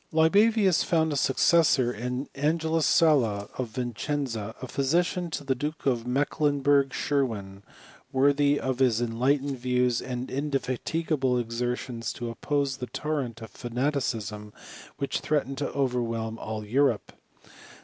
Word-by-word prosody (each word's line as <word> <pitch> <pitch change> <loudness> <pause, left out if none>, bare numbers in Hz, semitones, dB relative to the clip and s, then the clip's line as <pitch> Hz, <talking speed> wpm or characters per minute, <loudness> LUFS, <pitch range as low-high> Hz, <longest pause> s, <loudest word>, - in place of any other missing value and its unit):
Libavius 195 +4 +4
found 160 -2 +1
a - - -2
successor 135 -2 +3
in 125 +5 -4
Angelus 160 +2 +1
Sala, 115 -11 +3
of 130 - -1
Vicenza, 120 -1 -3
physician 170 +7 0
to 155 - -4
the 135 -1 +1
Duke 150 +5 -5
of 120 -3 0
Mecklenburg 140 0 +2
Schwerin, 110 -11 -2 0.5
worthy 145 +1 +3
of 130 -1 -2
his 125 -4 +3
enlightened 130 +4 0
views 125 -1 +1
and 125 0 -5
inde 145 +2 -3
fatigable 135 0 0
exertions 120 0 -3
to 120 -1 -5
oppose 140 +2 -1
the 125 - -5
torrent 125 -3 -3
of 110 - -10
fanaticism 120 -5 -3 0.4
which 140 - -2
threatened 140 -3 -1
to 145 - -1
overwhelm 115 -4 -1
all 110 -1 -5
Europe. 125 0 +1
130 Hz, 125 wpm, -27 LUFS, 120-145 Hz, 0.5 s, Libavius